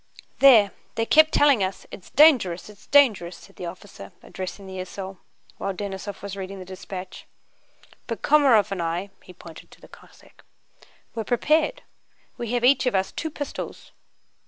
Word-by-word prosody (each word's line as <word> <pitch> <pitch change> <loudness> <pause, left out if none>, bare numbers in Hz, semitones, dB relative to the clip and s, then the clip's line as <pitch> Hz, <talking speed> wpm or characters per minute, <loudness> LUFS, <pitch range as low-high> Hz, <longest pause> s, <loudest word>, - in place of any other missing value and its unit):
"There, 230 -8 +7 0.2
they 225 - 0
kept 315 +5 +5
telling 280 -8 +4
us: 190 +1 -4
'It's 185 - -11
dangerous, 235 - +4
it's 205 - -20
dangerous,'" 220 -12 +3
said - - -18
the 180 - -6
officer, 170 - -11
addressing 185 +1 -7
the 190 -1 -8
esaul 190 0 -7 0.4
while 195 -1 -3
Denísov 200 0 -6
was 200 -1 -6
reading 195 0 -7
the 185 - -9
dispatch. 185 0 -9 0.8
"But 230 - -5
Komaróv 270 -10 +4
and 190 -3 -3
I"—he 180 +3 -5
pointed 165 -2 -13
to - - -18
the - - -16
Cossack—"were 225 - -14
prepared. 310 - +1 0.5
We 235 -1 -5
have 245 0 +1
each 265 0 +4
of 245 - 0
us 190 0 0
two 320 - -4
pistols.... 285 -2 -7
200 Hz, 155 wpm, -24 LUFS, 185-250 Hz, 0.8 s, There